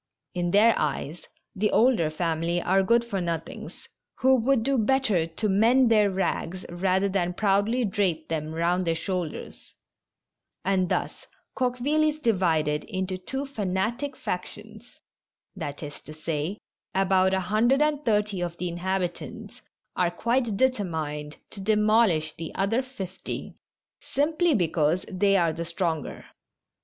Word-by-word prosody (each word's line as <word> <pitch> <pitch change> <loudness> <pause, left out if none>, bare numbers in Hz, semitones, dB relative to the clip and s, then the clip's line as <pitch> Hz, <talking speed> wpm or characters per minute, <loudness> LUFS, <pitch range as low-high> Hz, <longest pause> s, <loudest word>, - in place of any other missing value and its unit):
In 175 -1 -1
their 215 +5 +5
eyes 150 +2 -3 0.3
the 210 +2 +1
older 225 -9 +3
family 165 +1 -1
are 190 +2 +2
good 235 +5 +3
for 200 -5 -2
nothings, 165 -1 -5 0.3
who 260 +1 +4
would 250 0 +2
do 275 +3 +1
better 220 -8 +2
to 165 +7 -2
mend 230 +5 +4
their 210 -2 +5
rags 185 -1 -2
rather 185 +2 +1
than 180 -2 -1
proudly 210 +5 +2
drape 185 -5 0
them 155 -1 -3
round 175 +2 +1
their 165 - +2
shoulders; 180 -2 -5 0.9
and 185 -2 +1
thus - - -2 0.3
CoqUeville 260 +5 +1
is 305 0 -5
divided 165 - +1
into 190 -3 -3
two 265 +9 -4
fanatic 235 +3 -2
factions 215 +5 -7 0.3
— - - -58
that 145 +2 -6
is 145 -1 -8
to 155 - -11
say, 155 +4 -3 0.4
about 190 0 +3
a - - +1
hundred 220 +8 +2
and 300 -1 0
thirty 210 -5 +1
of 170 -1 -3
the 180 0 -2
inhabitants 180 +1 -4 0.3
are 180 -1 +2
quite 230 +3 0
determined 160 - -1
to 200 - -8
demol 215 +2 +4
ish 155 -2 -1
the 165 -1 -7
other 200 +6 +1
fifty, 195 -9 -6 0.5
simply 315 +2 +1
because 165 -1 +1
they 195 +1 +2
are 170 -3 +2
the 165 +1 -4
stronger. 170 -3 -3
190 Hz, 140 wpm, -26 LUFS, 170-225 Hz, 0.9 s, their